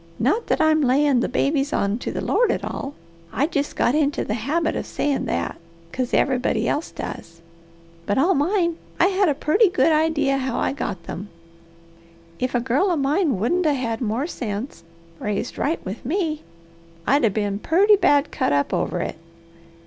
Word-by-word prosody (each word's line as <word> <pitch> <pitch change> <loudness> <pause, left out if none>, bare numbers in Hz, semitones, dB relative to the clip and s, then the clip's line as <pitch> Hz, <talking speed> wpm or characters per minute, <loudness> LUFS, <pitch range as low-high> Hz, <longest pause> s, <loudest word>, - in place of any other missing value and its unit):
Not 290 - +1
that - - +1
I'm 315 0 +4
layin' 275 0 +3
the - - 0
babies 275 +2 0
on 200 -2 0
to - - -4
the - - -4
Lord 485 -2 +2
at - - -2
all 275 +1 -5 0.4
I 280 - +1
jest 290 -3 -2
got 240 - +2
into 290 -1 +1
the 210 - -2
habit 280 +9 -1
of - - -4
sayin' 285 -2 -1
that, 85 0 -2 0.4
'cos 255 -1 -2
everybody 260 -2 +1
else 300 - -1
does, 165 0 -8 0.6
but 205 - +1
all 340 +8 +4
mine, 340 +2 +1 0.2
I 370 - +5
had 390 -2 +2
a 290 - +1
purty 380 - +3
good 325 -2 +3
idy 310 -2 +2
how 265 -2 0
I - - 0
got 190 -10 -4
them. 200 +4 -7 1.1
If 255 0 -1
a - - +3
girl 260 +10 +1
of 345 - +1
mine 285 - +1
wouldn't 325 - +1
'a' 295 - +3
had 230 -3 -3
more 235 +4 -1
sense, 215 - -5 0.4
raised 210 +3 -3
right 315 +4 -1
with 195 +4 -6
me, 310 +1 -1 0.6
I'd' 280 +3 +3
a' - - +4
been 205 0 -2
purty 395 - +4
bad 290 -6 +3
cut - - 0
up 140 0 +1
over 180 - -1
it. - - -4
275 Hz, 185 wpm, -22 LUFS, 230-315 Hz, 1.1 s, I